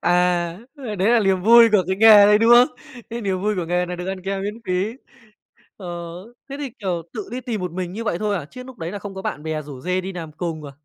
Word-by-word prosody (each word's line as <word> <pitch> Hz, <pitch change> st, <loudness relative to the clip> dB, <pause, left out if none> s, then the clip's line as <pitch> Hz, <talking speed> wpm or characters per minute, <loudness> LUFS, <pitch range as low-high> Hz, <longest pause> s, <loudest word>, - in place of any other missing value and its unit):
À, -, -, +1 dB, 0.7 s
ơ, 240 Hz, -7 st, -6 dB
đấy 190 Hz, +3 st, +1 dB
là 240 Hz, -, +5 dB
liềm 190 Hz, -2 st, +1 dB
vui 230 Hz, +2 st, +7 dB
của 205 Hz, -3 st, +5 dB
cái 190 Hz, -, 0 dB
nghề 210 Hz, -1 st, +8 dB
đấy, 210 Hz, 0 st, +5 dB
đúng 225 Hz, +1 st, +3 dB
không? 245 Hz, +3 st, +7 dB, 0.4 s
Cái 235 Hz, +1 st, -4 dB
niềm 190 Hz, -3 st, -2 dB
vui 210 Hz, +2 st, 0 dB
của 175 Hz, -, -2 dB
nghề 180 Hz, +1 st, 0 dB
là 180 Hz, 0 st, -5 dB
được 180 Hz, +1 st, -6 dB
ăn 190 Hz, -1 st, -5 dB
kem 195 Hz, +1 st, -3 dB
miễn 205 Hz, +1 st, -3 dB
phí. 185 Hz, +5 st, -1 dB, 0.8 s
Ờ, 190 Hz, -, -10 dB, 0.6 s
thế 275 Hz, -, -5 dB
thì, 280 Hz, -3 st, -5 dB
kiểu, 180 Hz, -5 st, -2 dB
tự 215 Hz, -4 st, -6 dB
đi 250 Hz, +2 st, -4 dB
tìm 235 Hz, -5 st, -4 dB
một 180 Hz, -2 st, -4 dB
mình 180 Hz, 0 st, -4 dB
như 230 Hz, +3 st, -5 dB
vậy 175 Hz, -6 st, -1 dB
thôi 210 Hz, 0 st, -1 dB
à, 165 Hz, -, -5 dB
chứ 255 Hz, 0 st, -10 dB
núc 260 Hz, -1 st, -13 dB
đấy 165 Hz, +3 st, -5 dB
là 205 Hz, -, -5 dB
không 200 Hz, -1 st, -8 dB
có 190 Hz, -, -7 dB
bạn 150 Hz, -, -4 dB
bè 155 Hz, -1 st, -3 dB
rủ 140 Hz, -3 st, -10 dB
rê 180 Hz, +5 st, -1 dB
đi 190 Hz, +1 st, -6 dB
làm 165 Hz, -3 st, -7 dB
cùng 155 Hz, -1 st, -5 dB
à? 140 Hz, -, -8 dB
195 Hz, 275 wpm, -21 LUFS, 180-220 Hz, 0.8 s, nghề